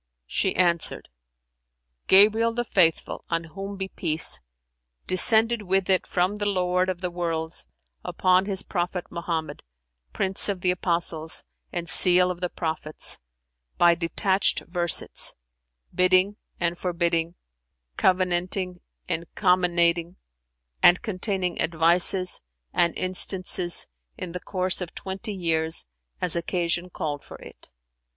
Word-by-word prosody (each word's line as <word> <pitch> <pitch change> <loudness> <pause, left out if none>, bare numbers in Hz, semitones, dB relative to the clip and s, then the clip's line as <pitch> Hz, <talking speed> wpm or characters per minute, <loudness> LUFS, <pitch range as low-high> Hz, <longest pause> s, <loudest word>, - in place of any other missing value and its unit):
She 190 - -1
answered, 170 -3 0 1.0
"Gabriel 220 +4 +5
the 240 - -1
Faithful 180 -8 0
(on 165 0 -1
whom 195 +5 -8
be 190 0 -4
peace!) 155 - 0 0.6
descended 220 +4 +4
with 190 -1 0
it 185 - +1
from 185 +3 0
the 205 0 -2
Lord 185 -1 0
of 185 -1 -4
the 180 -1 -3
Worlds 165 - -2 0.4
upon 185 +1 +2
His 195 -1 +3
Prophet 180 -1 -3
Mohammed, 165 -3 -4 0.5
Prince 190 - +2
of 195 -3 -3
the 180 - +2
Apostles 170 -3 +1 0.3
and 170 -1 -4
Seal 180 +3 +5
of 175 0 -8
the 180 - -1
Prophets, 160 -2 -1 0.6
by 175 0 +5
detached 190 +4 0
versets: 175 -1 0 0.6
bidding 185 +2 +3 0.2
and 175 0 -2
forbidding, 170 -1 -1 0.6
covenanting 180 0 0 0.3
and 170 -1 -3
comminating, 175 -2 +1 0.7
and 175 - +6
containing 190 -3 -3
advices 175 +3 +3 0.3
and 170 -1 +1
instances 185 -1 +1 0.3
in 180 - -6
the 180 - -5
course 185 0 -2
of 175 - -7
twenty 195 +2 -5
years 160 - +1 0.3
as 180 -2 0
occasion 175 0 -2
called 145 -4 -5
for - - -11
it." - - -15
180 Hz, 120 wpm, -24 LUFS, 170-190 Hz, 1.0 s, and